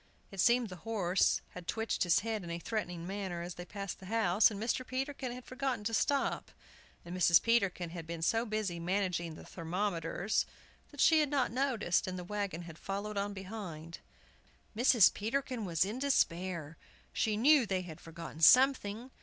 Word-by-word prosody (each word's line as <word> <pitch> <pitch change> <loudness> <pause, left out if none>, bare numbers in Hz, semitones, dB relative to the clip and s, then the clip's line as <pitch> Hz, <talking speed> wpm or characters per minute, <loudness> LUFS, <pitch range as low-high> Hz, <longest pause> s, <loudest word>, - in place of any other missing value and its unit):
It 195 - -9
seemed 240 +1 +3
the 185 - -8
horse 195 -3 +1
had 180 -2 -10
twitched 225 0 -2
his 175 -3 +4
head 220 -2 -3
in 170 - -7
a 170 - -3
threatening 175 -3 -4
manner 190 -3 -4
as 175 +1 -6
they 175 - -8
passed 200 +1 -6
the 190 - -11
house, 210 -2 +4
and 205 -3 -6
Mr. 230 +3 -1
Peterkin 260 0 -3
had 250 0 -8
forgotten 255 -3 -3
to 225 +2 -2
stop, 280 +6 0 0.6
and 175 +1 -6
Mrs. 175 -2 +6
Peterkin 195 -7 +1
had 165 -2 -7
been 165 -1 -5
so 225 +6 +2
busy 215 -6 -2
managing 175 -2 -1
the - - -12
thermometers 180 +2 -2 0.4
that 290 - -5
she 320 -1 +6
had 300 -2 +2
not 275 -6 +1
noticed, 235 -10 0
and 185 0 -4
the 180 - -5
wagon 200 -3 -3
had 165 -1 -11
followed 200 +2 -4
on 200 +1 -1
behind. 185 -5 -7 0.8
Mrs. 235 -3 +6
Peterkin 235 +1 -2
was 170 -1 +1
in 215 +6 -4
despair. 175 - 0 0.4
She 215 -1 0
knew 270 +1 +5
they 185 -2 -1
had 160 -3 -10
forgotten 165 -1 -9
something! 250 - +5
200 Hz, 180 wpm, -33 LUFS, 175-230 Hz, 0.8 s, Mrs